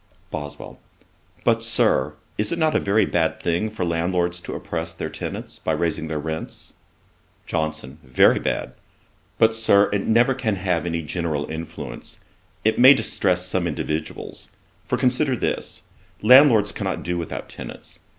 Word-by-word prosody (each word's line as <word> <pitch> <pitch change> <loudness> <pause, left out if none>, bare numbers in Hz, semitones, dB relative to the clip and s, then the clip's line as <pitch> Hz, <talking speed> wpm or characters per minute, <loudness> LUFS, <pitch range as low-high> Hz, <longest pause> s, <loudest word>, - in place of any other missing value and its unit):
BOSWELL. 75 -1 -7 0.6
'But, - - +2
Sir, 65 - +2 0.2
is 105 0 0
it 170 - -1
not 160 -2 +1
a - - +4
very 100 +1 +2
bad 85 -3 0
thing 90 +5 0
for 105 -4 -3
landlords 85 +1 0
to - - -6
oppress 80 -1 -5
their - - -5
tenants, - - -6
by - - -1
raising 80 -1 -1
their 80 -1 -3
rents?' 80 +1 -5 0.7
JOHNSON. 80 -2 -3
'Very 65 -1 +4
bad. - - -2 0.6
But, 110 0 +4
Sir, 105 -3 +4
it 100 - -1
never 120 +4 +4
can 120 -5 -1
have 90 -3 -1
any 85 -1 -2
general 75 -2 -2
influence; 80 0 -7 0.5
it 110 - +2
may 130 +3 +9
distress 90 -6 0
some 90 -1 -1
individuals. 75 0 -5 0.4
For, - - 0
consider 130 +2 +2
this: - - -3 0.4
landlords 115 -4 +7
cannot 95 -2 -3
do 90 0 -2
without 85 - -5
tenants. - - -9
90 Hz, 150 wpm, -23 LUFS, 80-110 Hz, 0.7 s, may